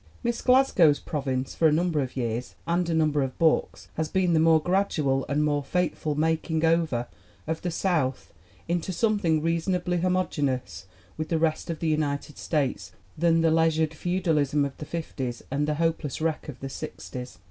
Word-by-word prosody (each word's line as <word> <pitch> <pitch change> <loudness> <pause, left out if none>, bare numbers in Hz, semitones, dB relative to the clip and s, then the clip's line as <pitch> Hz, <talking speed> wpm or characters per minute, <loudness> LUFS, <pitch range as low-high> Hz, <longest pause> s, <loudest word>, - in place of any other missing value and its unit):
Miss 235 -1 -1
Glasgow's 210 - +4
province 135 -3 -3
for 165 - +3
a - - +4
number 165 0 +1
of 130 -1 -3
years 120 0 -3
and 170 +1 0
a - - +1
number 155 -2 +2
of 135 -1 -3
books 160 -1 +1
has 160 -1 -1
been 185 -2 +2
the 160 - +4
more 160 0 +5
gradual 155 -6 0
and 145 +1 +1
more 145 -1 +1
fateful 160 -1 -1
making 160 +1 0
over 160 -7 +1 0.4
of 160 +1 -3
the 180 - -2
South 160 -7 -1 0.3
into 175 +2 -1
something 180 -6 +1
reasonably 175 +2 0
homogeneous 145 - -1 0.3
with 155 0 -3
the 165 - +1
rest 160 0 0
of 165 - -2
the 165 - 0
United 150 -1 -2
States 130 - -1 0.2
than 165 +1 +3
the 165 -1 +3
leisured 160 -1 +2
feudalism 155 -5 +1
of 140 -1 -5
the 150 - -7
'505 135 -7 -5
and 145 +2 0
the 150 - 0
hopeless 165 -3 -1
wreck 160 -1 -2
of 135 - -9
the 135 - -4
'6os. 125 -3 -7
160 Hz, 175 wpm, -26 LUFS, 145-170 Hz, 0.4 s, more